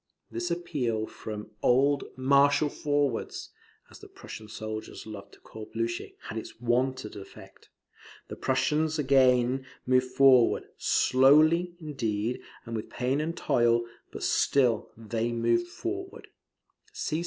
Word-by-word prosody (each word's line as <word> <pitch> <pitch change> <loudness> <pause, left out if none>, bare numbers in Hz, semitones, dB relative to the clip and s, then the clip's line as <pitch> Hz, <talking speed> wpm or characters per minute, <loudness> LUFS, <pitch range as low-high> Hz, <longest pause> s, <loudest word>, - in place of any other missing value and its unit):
This 115 +10 -3
appeal 135 -11 -2
from 105 -1 -8
old 140 +3 +3
"Marshal 140 +3 +4
Forwards," 145 -5 -2 0.4
as - - -13
the - - -12
Prussian 110 - -10
soldiers 110 0 -6
loved 105 -2 -10
to - - -17
call 110 -1 -10
Blucher, 115 +1 -2 0.2
had 110 0 -5
its 110 - -11
wonted 125 0 -1
affect. 100 -1 -13 0.6
The - - -7
Prussians 150 +5 0
again 130 -2 +3 0.2
moved 130 0 +3
forward, 130 -2 +4
slowly, 155 +7 +4
indeed, 120 -7 -2 0.2
and 115 -1 -5
with 110 - -5
pain 130 +4 -1
and 165 +2 -3
toil; 120 0 +2 0.3
but - - -7
still 125 -6 +2
they 115 +1 -2
moved 115 +7 +1
forward. 375 - -6
130 Hz, 120 wpm, -28 LUFS, 115-145 Hz, 0.6 s, Marshal